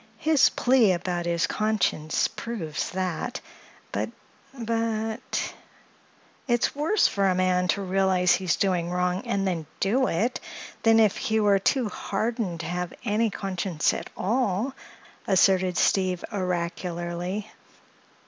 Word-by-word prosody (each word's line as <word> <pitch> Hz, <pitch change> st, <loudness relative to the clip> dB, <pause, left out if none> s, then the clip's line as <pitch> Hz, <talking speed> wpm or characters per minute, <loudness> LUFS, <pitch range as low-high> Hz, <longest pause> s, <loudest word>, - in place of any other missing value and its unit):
His 310 Hz, -3 st, +4 dB
plea 245 Hz, -6 st, +4 dB
about 175 Hz, -1 st, -2 dB
his 170 Hz, 0 st, +1 dB
conscience 215 Hz, -8 st, 0 dB
proves 170 Hz, -10 st, -4 dB
that. 185 Hz, +7 st, -3 dB, 0.5 s
But—but—" 225 Hz, -1 st, -3 dB, 0.9 s
"It's 240 Hz, +1 st, +1 dB
worse 315 Hz, +9 st, +3 dB
for 200 Hz, -1 st, +1 dB
a 185 Hz, -, +2 dB
man 180 Hz, 0 st, +2 dB
to 200 Hz, +2 st, 0 dB
realize 185 Hz, -1 st, +3 dB
he's 185 Hz, -3 st, +1 dB
doing 180 Hz, -3 st, 0 dB
wrong, 180 Hz, +1 st, 0 dB
and 195 Hz, -1 st, 0 dB
then 165 Hz, -5 st, -2 dB
do 250 Hz, +7 st, +2 dB
it, 225 Hz, +10 st, 0 dB, 0.4 s
than 225 Hz, 0 st, +5 dB
if 215 Hz, -3 st, +4 dB
he 220 Hz, 0 st, 0 dB
were 205 Hz, -2 st, +4 dB
too 245 Hz, +4 st, +1 dB
hardened 205 Hz, -4 st, -2 dB
to -, -, -6 dB
have 175 Hz, +1 st, -3 dB
any 220 Hz, +2 st, +2 dB
conscience 185 Hz, -5 st, -1 dB
at -, -, -5 dB
all," 225 Hz, +3 st, 0 dB, 0.5 s
asserted 185 Hz, -1 st, +3 dB
Steve 185 Hz, -2 st, +2 dB
oracularly. 180 Hz, +1 st, -3 dB
190 Hz, 120 wpm, -26 LUFS, 180-225 Hz, 0.9 s, than